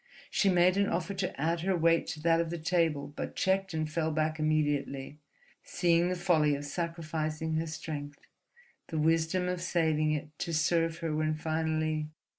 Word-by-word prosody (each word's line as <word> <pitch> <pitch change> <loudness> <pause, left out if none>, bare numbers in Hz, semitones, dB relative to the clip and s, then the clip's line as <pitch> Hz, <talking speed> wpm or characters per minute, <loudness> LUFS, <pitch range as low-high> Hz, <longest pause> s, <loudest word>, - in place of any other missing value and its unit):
She 200 - +3
made 180 +1 +4
an 200 0 +2
offer 175 +3 -1
to 180 -6 -3
add 165 +3 +1
her 185 +1 +1
weight 165 0 +3
to 155 - -5
that 165 +1 +3
of 165 - -3
the 170 - -3
table, 160 -4 0
but - - -5
checked 195 +1 +1
and 155 -1 -1
fell 160 0 -1
back 155 0 -1
immediately, 145 -2 -1 0.4
seeing 175 -1 +2
the 185 - 0
folly 165 -5 +3
of 145 +1 -6
sacrificing 160 -1 -3
her 165 +1 -1
strength, 145 -2 -6 0.7
the 160 - -4
wisdom 165 +3 +2
of 180 -1 -2
saving 160 -3 +1
it 150 0 -3
to 170 - -2
serve 165 +1 +1
her 155 -2 -1
when 155 0 0
finally.... 155 -1 -1
160 Hz, 175 wpm, -30 LUFS, 155-170 Hz, 0.7 s, made